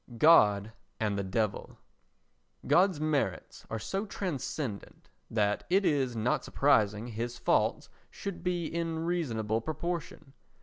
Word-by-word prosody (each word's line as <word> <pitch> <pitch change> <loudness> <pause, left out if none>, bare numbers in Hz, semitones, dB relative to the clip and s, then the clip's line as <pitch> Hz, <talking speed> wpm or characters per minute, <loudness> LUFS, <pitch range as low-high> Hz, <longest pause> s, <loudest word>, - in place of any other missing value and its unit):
God 105 -8 +5 0.3
and 105 -2 0
the 100 - -1
Devil 105 +2 -2 0.9
God's 185 -3 +4
merits 145 - -2
are 115 - -2
so 195 - -3
transcendent 140 - -5 0.2
that 105 -2 +1
it 195 +2 +3
is 135 -6 +1
not 115 +3 0
surprising 110 -6 +2
his 120 +2 -4
faults - - +1 0.2
should 195 -4 -6
be 175 -2 -1
in 165 0 -2
reasonable 115 -11 -1
proportion. 155 -1 -5
135 Hz, 120 wpm, -30 LUFS, 110-170 Hz, 0.9 s, God